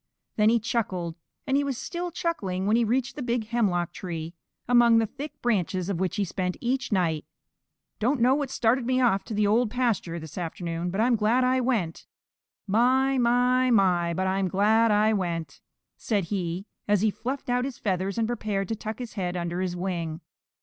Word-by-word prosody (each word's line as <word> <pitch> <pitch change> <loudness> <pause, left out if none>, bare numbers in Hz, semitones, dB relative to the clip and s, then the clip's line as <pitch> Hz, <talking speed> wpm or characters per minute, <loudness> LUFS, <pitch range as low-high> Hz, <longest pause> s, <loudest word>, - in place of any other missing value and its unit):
Then 210 0 +4
he 235 +1 +3
chuckled, 190 -7 -2 0.3
and 270 - +1
he 285 - +3
was 275 -3 -2
still 350 +5 -4
chuckling 220 - -2
when 210 +2 +3
he 235 - +3
reached 250 +4 0
the 295 - -6
big 240 -2 -1
hemlock 185 -8 +1
tree, 165 -2 -5 0.3
among 240 -1 +6
the 225 - +3
thick 280 +7 -8
branches 190 -5 0
of 185 -4 -1
which 185 -1 -1
he 205 -2 0
spent 180 0 -3
each 255 +1 -1
night. 165 -6 +1 0.8
"Don't 255 +5 +1
know 250 +3 +5
what 285 -1 -1
started 240 0 +1
me 255 0 +2
off 230 -6 +3
to 220 - -5
the 210 0 +2
Old 220 +3 +3
Pasture 225 -8 -1
this 160 +1 -7
afternoon, 170 0 -3
but 195 +4 -1
I'm 240 +1 +3
glad 225 +4 +2
I 255 +1 +2
went. 220 -10 -1 0.6
My, 255 +6 +3
my, 250 +1 +3
my, 180 -6 +3
but 190 - 0
I'm 190 0 +1
glad 215 +5 +3
I 215 +1 +3
went," 170 -7 -3 0.4
said 205 -4 0
he, 180 0 -2 0.2
as 205 -2 +3
he 215 0 +3
fluffed 260 +6 -5
out 245 0 +1
his 265 -2 -4
feathers 190 0 -2
and 225 -1 +1
prepared 210 -4 -2
to 225 - -1
tuck 220 0 -6
his 245 -3 -7
head 180 -3 -2
under 175 +1 -2
his 180 -1 -2
wing. 175 -3 -3
215 Hz, 195 wpm, -26 LUFS, 185-245 Hz, 0.8 s, among